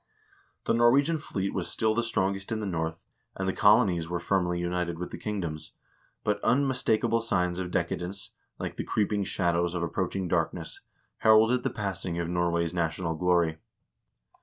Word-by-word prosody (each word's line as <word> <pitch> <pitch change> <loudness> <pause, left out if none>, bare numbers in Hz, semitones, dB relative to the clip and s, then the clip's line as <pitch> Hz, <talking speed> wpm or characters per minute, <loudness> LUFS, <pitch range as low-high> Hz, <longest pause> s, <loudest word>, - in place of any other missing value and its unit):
The - - +2
Norwegian 135 +7 +4
fleet 100 -8 -3
was 95 -3 -1
still 110 -1 +1
the 115 - +1
strongest 95 -3 -1
in 110 - -1
the 105 - -3
North, 80 -3 -2 0.4
and 95 - -3
the 95 - +1
colonies 100 -6 +4
were 90 0 -1
firmly 90 -1 0
united 85 -1 -2
with 90 +1 -5
the - - -6
kingdom. 90 -8 -3 0.6
But 105 0 0
unmis 130 0 +2
takable 115 +1 +2
signs 90 -5 0
of 90 -1 -3
decadence, 90 +2 -2 0.3
like - - -5
the - - -2
creeping 105 -1 0
shadows 85 -1 0
of 85 - -1
approach 90 +2 -2
ing 95 -2 -1
darkness, - - -2 0.4
heralded 110 +3 +5
the - - -1
passing 95 -4 -4
of 85 -1 -1
Norway's 85 -1 0
national 85 0 -1
glory. 85 -1 +1
95 Hz, 165 wpm, -28 LUFS, 85-110 Hz, 0.6 s, heralded